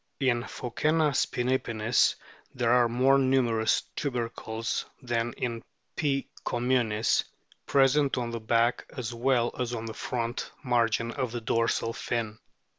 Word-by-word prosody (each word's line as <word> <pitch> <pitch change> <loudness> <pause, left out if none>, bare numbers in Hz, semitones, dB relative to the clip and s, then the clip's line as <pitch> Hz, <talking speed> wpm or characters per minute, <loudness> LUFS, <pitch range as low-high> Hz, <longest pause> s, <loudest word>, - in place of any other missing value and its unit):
In 125 -4 +2
Phoccena 150 +5 0
spinipinnis 120 -3 +1 0.4
there 120 -2 +1
are 120 -1 +5
more 130 +3 +4
numerous 125 -4 +2
tubercles 115 -4 -3
than 120 -2 -1
in 115 -2 -3 0.3
P. 140 -4 0 0.2
com 120 +1 -2
munis, 115 -4 +2 0.4
present 140 0 +3
on 120 -2 -2
the 115 - -3
back 115 +2 +1
as 125 -2 -3
well 120 0 +1
as 125 -1 -1
on 115 -1 -5
the 110 - -5
front 120 +1 -3
margin 115 -2 +1
of 125 -1 -2
the 120 0 -4
dorsal 115 0 0
fin. 110 -3 -3
120 Hz, 130 wpm, -28 LUFS, 115-130 Hz, 0.4 s, are